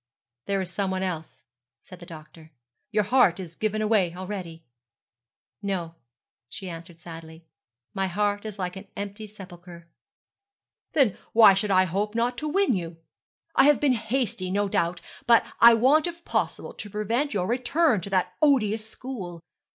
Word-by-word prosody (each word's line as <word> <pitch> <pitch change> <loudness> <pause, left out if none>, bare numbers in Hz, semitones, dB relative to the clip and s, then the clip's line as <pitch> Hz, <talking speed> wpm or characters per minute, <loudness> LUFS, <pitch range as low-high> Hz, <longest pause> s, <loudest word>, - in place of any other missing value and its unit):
'There 195 -1 0
is 180 -1 -5
some 195 0 -1
one 190 0 -2
else,' 160 -7 -5 0.4
said 185 - -13
the 175 - -12
doctor. 160 0 -13 0.4
'Your 210 -1 +1
heart 200 -5 +3
is 175 -3 -7
given 215 +2 -1
away 200 -6 +2
already.' 180 -3 -7 1.0
'No,' 185 -5 -3 0.6
she 190 - -7
answered 165 0 -10
sadly; 165 -1 -11 0.5
'my 195 -1 -1
heart 205 +2 -1
is 215 -2 -7
like 180 -1 -3
an 195 +1 -10
empty 205 +2 -6
sepulchre.' 175 -4 -12 1.1
'Then 260 -10 +2
why 220 -3 +8
should 195 +2 -1
I 185 -1 +5
not 175 - -7 0.2
hope 240 +1 0
to 305 - -3
win 390 -1 +2
you? 170 -4 -4 0.6
I - - +6
have 295 -1 +5
been 285 -3 +3
hasty, 225 -4 -2
no 205 +2 0
doubt: 170 -2 -1 0.3
but 235 -1 +6
I 235 0 +9
want 280 +8 +4
if 340 0 -8
possible - - -2
to 205 - -8
prevent 225 +8 -1
your 180 -3 0
return 250 - +2
to 200 - -6
that 185 -1 0
odious 220 -7 +2
school. 190 -11 -7
200 Hz, 160 wpm, -26 LUFS, 180-230 Hz, 1.1 s, I